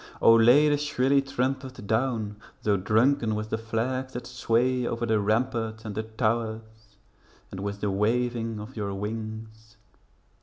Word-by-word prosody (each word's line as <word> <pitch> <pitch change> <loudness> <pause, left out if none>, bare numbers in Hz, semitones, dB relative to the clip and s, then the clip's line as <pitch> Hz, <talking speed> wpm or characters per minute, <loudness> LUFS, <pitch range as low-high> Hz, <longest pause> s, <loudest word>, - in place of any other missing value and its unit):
O! 115 - +7
lay 120 +7 +6
the 145 -1 +3
shrilly 140 -2 +2
trumpet 130 -2 -3
down, 110 -2 -1 0.3
Though 105 -1 +3
drunken 110 +4 +2
with 110 0 -4
the - - 0
flags 130 +4 -2
that 125 - -5
sway 125 +1 +1
Over 115 0 -2
the 110 -2 +2
ramparts 110 +1 -1
and 105 - -4
the 110 - -2
towers, 110 -1 -3 0.5
And 95 - -7
with 100 +1 -4
the 105 - 0
waving 115 +2 0
of 105 - -9
your 100 -3 -3
wings. 110 +1 -6
115 Hz, 150 wpm, -27 LUFS, 110-125 Hz, 0.5 s, O